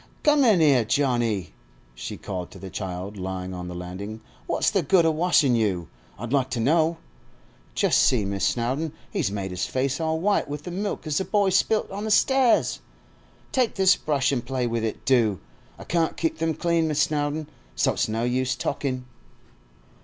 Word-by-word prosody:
'Come 295 -2 +4
in 215 -9 +5
'ere, 135 -6 +5
Johnny,' 115 -5 0 0.4
she - - -7
Called 90 -3 -5
to - - -13
the 95 -1 -9
child 95 +1 -5
lying 95 0 -4
on 90 -1 -6
the 90 - -6
landing. 95 +5 -6 0.3
'What's - - +1
the - - +2
good 185 -4 +3
o' 160 - +4
washin' 155 -5 +3
you, 95 -7 0 0.3
I'd 120 +5 -5
like 135 -2 +2
to 125 - -2
know? 160 +6 +2 0.8
Just - - +3
see, 110 -5 +3
Miss 100 -1 -3
Snowdon, 130 +9 0 0.2
he's - - 0
made 100 -2 -4
his 90 0 -2
face 135 +4 -1
all 160 0 0
white 200 -1 +1
with 145 0 -5
the 180 - -6
milk 200 +2 -3
as 150 -2 0
the - - 0
boy 205 -2 +2
spilt 215 +3 +1
on 200 +2 -4
the - - -2
stairs! 240 - +3 0.7
Take 250 -3 +1
this 190 -1 +5
brush 140 -3 0
an' 125 - 0
play 130 0 -2
with 115 -1 -1
it, 110 - -4
do! 115 -7 +3 0.4
I - - -10
can't 165 -1 0
keep 160 -1 -2
'em 165 -1 +1
clean, 170 0 +1
Miss 155 -1 +2
Snowdon, 150 0 -1 0.3
so - - +2
it's - - -1
no 110 +2 -1
use 125 +1 0
talkin'. 130 -3 -3
130 Hz, 190 wpm, -25 LUFS, 105-165 Hz, 0.8 s, in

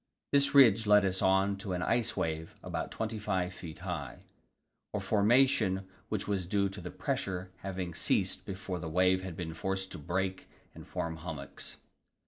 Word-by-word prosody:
This 140 0 +4
ridge 115 -6 +7
led 105 -1 +6
us 95 0 0
on 95 +1 +3
to 100 -2 -4
an 90 0 -1
icewave 80 -9 0
about - - -3
25 105 -5 -2
feet 85 -2 -8
high 75 -9 -4 0.7
a - - +1
formation 105 -3 +3 0.2
which 105 -2 -2
was 95 -4 -1
due 100 0 +2
to 95 0 -7
the 90 - -6
pressure 95 0 -3
having 90 -2 -4
ceased - - +1
before 95 -1 -5
the 80 -1 -4
wave 90 +3 +3
had 95 -3 -6
been 80 -3 -4
forced 95 +3 -2
to - - -5
break 95 +4 -2 0.2
and - - -11
form 80 0 -3
hummocks. 80 -4 -7
95 Hz, 160 wpm, -32 LUFS, 90-100 Hz, 0.7 s, ridge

